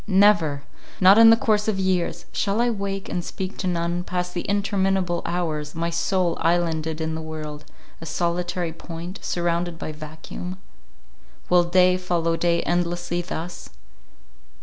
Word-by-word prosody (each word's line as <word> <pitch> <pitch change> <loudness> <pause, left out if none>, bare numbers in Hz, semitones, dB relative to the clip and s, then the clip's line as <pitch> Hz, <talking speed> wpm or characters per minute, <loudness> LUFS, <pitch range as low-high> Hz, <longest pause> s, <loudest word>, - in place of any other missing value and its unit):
—never!—not 190 0 +3
in 230 0 +9
the 225 - +7
course 210 -2 +1
of 215 -3 +1
years!—Shall 190 +2 -1
I 240 0 +3
wake, 195 -2 -3
and 175 - -3
speak 190 +2 -5
to 185 - -1
none, 175 0 -1
pass 180 -1 -2
the 175 0 -4
interminable 195 -3 +1
hours, 155 -4 -2
my 170 +1 -1
soul, 175 +1 +1
islanded 160 -2 +1
in 160 0 -2
the 160 - -4
world, 155 -1 -7 0.4
a 165 - -7
solitary 175 +1 -1
point, 170 +3 -8
surrounded 170 0 -1
by 155 - -5
vacuum? 155 +4 -8 0.9
Will 180 -1 +5
day 180 +1 +4
follow 170 -2 0
day 170 0 +1
endlessly 175 0 -1
thus? 175 0 -6
175 Hz, 140 wpm, -24 LUFS, 165-185 Hz, 0.9 s, in